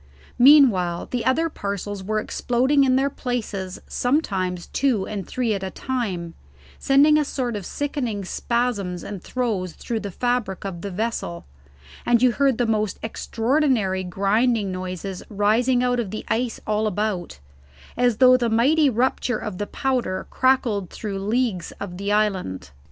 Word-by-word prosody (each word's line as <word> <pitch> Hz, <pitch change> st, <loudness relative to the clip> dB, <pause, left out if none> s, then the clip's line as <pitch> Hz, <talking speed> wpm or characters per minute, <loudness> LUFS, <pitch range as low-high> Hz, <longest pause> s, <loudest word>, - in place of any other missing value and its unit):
Meanwhile, 240 Hz, -, +5 dB
the 245 Hz, -2 st, -1 dB
other 320 Hz, +6 st, +2 dB
parcels 200 Hz, -, -5 dB
were 215 Hz, +2 st, 0 dB
exploding 260 Hz, +6 st, +1 dB
in 255 Hz, -1 st, +3 dB
their 270 Hz, +1 st, +2 dB
places 215 Hz, -8 st, -4 dB
sometimes 190 Hz, -, -1 dB
two 245 Hz, -8 st, 0 dB
and 200 Hz, -3 st, -5 dB
three 245 Hz, -4 st, -1 dB
at 200 Hz, -, -3 dB
a 190 Hz, -, -3 dB
time, 190 Hz, -8 st, -3 dB, 0.5 s
sending 290 Hz, +3 st, +5 dB
a -, -, +2 dB
sort 255 Hz, -5 st, -3 dB
of 200 Hz, -3 st, -5 dB
sickening 250 Hz, -9 st, -3 dB
spasms 205 Hz, -4 st, -1 dB
and 200 Hz, -3 st, -6 dB
throes 210 Hz, -9 st, -2 dB
through 230 Hz, -2 st, -4 dB
the 205 Hz, -, -5 dB
fabric 235 Hz, -2 st, -2 dB
of 175 Hz, -3 st, -5 dB
the 200 Hz, -, -4 dB
vessel, 195 Hz, -3 st, -3 dB, 0.6 s
and 240 Hz, -1 st, +3 dB
you 250 Hz, -, +6 dB
heard 275 Hz, -1 st, +2 dB
the 245 Hz, -, +1 dB
most 215 Hz, -3 st, 0 dB
extraordinary 225 Hz, -4 st, 0 dB
grinding 200 Hz, +3 st, +1 dB
noises 185 Hz, +1 st, -5 dB
rising 230 Hz, +5 st, +2 dB
out 245 Hz, -1 st, +1 dB
of 225 Hz, -5 st, -2 dB
the 215 Hz, -, -6 dB
ice 235 Hz, 0 st, -1 dB
all 215 Hz, 0 st, 0 dB
about, 205 Hz, -, -2 dB, 0.6 s
as 245 Hz, -3 st, +2 dB
though 255 Hz, 0 st, +7 dB
the 240 Hz, -2 st, 0 dB
mighty 280 Hz, +7 st, +4 dB
rupture 245 Hz, 0 st, 0 dB
of 205 Hz, -4 st, -6 dB
the 205 Hz, -, -2 dB
powder 250 Hz, -8 st, -1 dB
crackled 235 Hz, -8 st, +1 dB
through 200 Hz, -3 st, -5 dB
leagues 210 Hz, -3 st, -1 dB
of 180 Hz, -3 st, -7 dB
the 200 Hz, +1 st, -2 dB
island. 185 Hz, -, -1 dB
220 Hz, 155 wpm, -23 LUFS, 195-250 Hz, 0.6 s, though